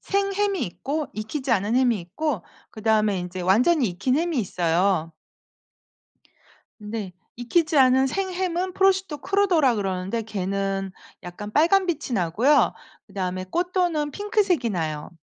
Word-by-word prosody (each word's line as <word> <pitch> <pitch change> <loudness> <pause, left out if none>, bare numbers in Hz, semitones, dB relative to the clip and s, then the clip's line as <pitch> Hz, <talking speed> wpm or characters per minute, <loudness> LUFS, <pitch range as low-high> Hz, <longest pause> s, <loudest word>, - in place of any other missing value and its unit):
생햄이 395 -1 0
있고 285 - -4
익히지 255 +6 -4
않은 215 +1 +1
햄이 245 -5 +2
있고 210 - -3 0.3
그다음에 215 -2 +1
인제 180 +1 -5
완전히 240 - +3
익힌 195 +9 0
햄이 330 -2 0
있어요. 175 -3 0 1.7
근데 210 -2 -5 0.2
익히지 310 +6 +1
않은 265 0 +5
생햄은 370 +1 -2
prosciutto 380 -4 +2
crudo라고 350 - +2
그러는데 195 +2 -2
걔는 195 -1 -2 0.3
약간 195 +4 -8
빨간빛이 330 - +2
나고요. 220 - +3 0.3
그다음에 185 -1 -4
cotto는 350 -4 0
핑크색이 395 - 0
나요. 155 -6 -3
245 Hz, 345 characters per minute, -24 LUFS, -, 1.7 s, 않은